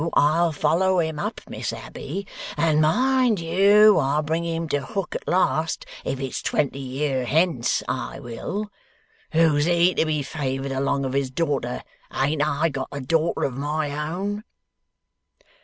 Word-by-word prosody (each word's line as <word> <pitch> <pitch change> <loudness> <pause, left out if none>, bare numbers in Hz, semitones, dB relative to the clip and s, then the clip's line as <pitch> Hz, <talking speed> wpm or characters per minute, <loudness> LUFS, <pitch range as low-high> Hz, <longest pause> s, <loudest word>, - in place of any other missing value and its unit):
I'll 165 +3 +3
follow 165 +5 +2
him 160 -3 0
up, - - -3
Miss - - -4
Abbey! 190 +8 -6 0.3
And 155 -2 +3
mind 250 +6 +3
you! 200 +5 +5
I'll 145 +3 +1
bring 160 +2 -1
him 165 0 -2
to 145 - 0
hook 195 +6 -4
at - - -6
last, 165 -3 +1 0.2
if 135 - -3
it's 135 -1 -3
twenty 140 -2 0
year 135 0 -1
hence, 155 -3 +1
I 130 +1 -3
will! 140 - -5 0.6
Who's 155 -3 +3
he, 175 +1 +4
to - - +2
be 150 -2 0
favoured 135 -2 -3
along 135 +1 0
of 130 - -3
his 135 -1 0
daughter? 130 -4 -2 0.3
Ain't 145 +3 0
I 150 +2 +1
got 135 -2 -4
a 140 - -5
daughter 160 +5 0
of 135 - 0
my 145 +2 -2 0.2
own! 200 +5 -3
155 Hz, 155 wpm, -24 LUFS, 140-170 Hz, 0.6 s, you